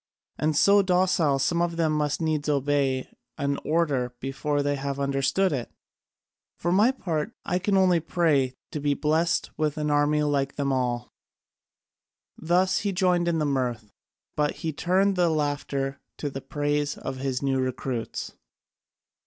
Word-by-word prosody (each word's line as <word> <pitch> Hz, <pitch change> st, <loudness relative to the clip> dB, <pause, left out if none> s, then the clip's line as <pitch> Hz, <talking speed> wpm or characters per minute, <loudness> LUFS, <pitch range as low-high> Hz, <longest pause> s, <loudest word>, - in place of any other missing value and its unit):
And 155 Hz, -1 st, +1 dB
so 200 Hz, +4 st, +6 dB
docile, 180 Hz, -6 st, +2 dB
some 170 Hz, +5 st, +1 dB
of 170 Hz, -1 st, -1 dB
them 160 Hz, -2 st, +2 dB
must 150 Hz, 0 st, 0 dB
needs 155 Hz, -2 st, 0 dB
obey 140 Hz, -2 st, +1 dB, 0.3 s
an 140 Hz, 0 st, -1 dB
order 140 Hz, -7 st, 0 dB
before 145 Hz, +2 st, -1 dB
they 145 Hz, 0 st, 0 dB
have 140 Hz, 0 st, -4 dB
understood 140 Hz, +7 st, +1 dB
it! 125 Hz, -4 st, -3 dB, 0.9 s
For 175 Hz, -, -1 dB
my 205 Hz, +6 st, +5 dB
part 170 Hz, -, -2 dB
I 180 Hz, -, 0 dB
can 195 Hz, +2 st, +1 dB
only 185 Hz, -3 st, +4 dB
pray 150 Hz, -6 st, +1 dB, 0.2 s
to 150 Hz, -, -3 dB
be 145 Hz, 0 st, +1 dB
blest 160 Hz, +4 st, +1 dB
with 155 Hz, 0 st, 0 dB
an 150 Hz, -1 st, -1 dB
army 145 Hz, +1 st, +2 dB
like 140 Hz, -2 st, 0 dB
them 140 Hz, -1 st, 0 dB
all." 125 Hz, -2 st, -1 dB, 1.2 s
Thus 180 Hz, +3 st, +2 dB
he 200 Hz, -, -1 dB
joined 180 Hz, -2 st, +2 dB
in 170 Hz, -1 st, +1 dB
the 155 Hz, -, 0 dB
mirth, 125 Hz, -6 st, -2 dB, 0.4 s
but 150 Hz, -1 st, 0 dB
he 160 Hz, -, -1 dB
turned 190 Hz, +5 st, +2 dB
the 175 Hz, -1 st, +3 dB
laughter 145 Hz, -3 st, -2 dB, 0.2 s
to 145 Hz, -, -3 dB
the 135 Hz, -, -6 dB
praise 145 Hz, 0 st, -1 dB
of 135 Hz, 0 st, -5 dB
his 130 Hz, 0 st, -2 dB
new 135 Hz, -1 st, +1 dB
recruits. 130 Hz, -2 st, -3 dB
150 Hz, 155 wpm, -26 LUFS, 135-170 Hz, 1.2 s, so